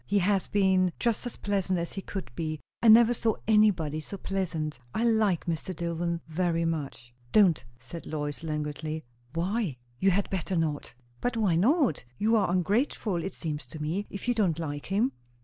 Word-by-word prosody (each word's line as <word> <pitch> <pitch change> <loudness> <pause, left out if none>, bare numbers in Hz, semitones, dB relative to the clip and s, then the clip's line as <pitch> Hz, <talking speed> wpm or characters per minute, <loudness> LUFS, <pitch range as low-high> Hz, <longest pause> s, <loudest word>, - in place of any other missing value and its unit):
He 205 - +2
has 195 0 +2
been 190 -3 +3
just 235 +1 0
as 245 - -7
pleasant 195 -2 0
as 170 0 -3
he 195 - -4
could 195 -5 -6
be. 155 +1 -3 0.2
I 235 - +3
never 230 +2 +8
saw 225 -2 0
anybody 195 -9 +3
so 175 +6 -6
pleasant. 170 -7 -3 0.2
I 225 - +1
like 220 -6 +2
Mr. 170 +2 -3
Dillwyn 170 +1 -2
very 165 0 0
much." 140 -7 -4 0.2
"Don't!" 190 -9 +5 0.2
said 120 +8 -9
Lois 145 -1 -3
languidly. 155 0 -3 0.3
"Why?" 185 - -1 0.2
"You 195 - +4
had 195 +1 +1
better 185 0 -2
not." 155 -6 -1 0.3
"But 245 -1 -1
why 200 -7 +3
not? 245 - +3
You 220 +2 +3
are 210 - +3
ungrateful, 200 - +1
it 190 - -4
seems 150 -5 -4
to 150 - -9
me, 170 +7 -2
if 200 - -7
you 245 - +3
don't 195 -9 +1
like 145 -3 -4
him." 215 +8 +2
180 Hz, 180 wpm, -28 LUFS, 160-205 Hz, 0.3 s, never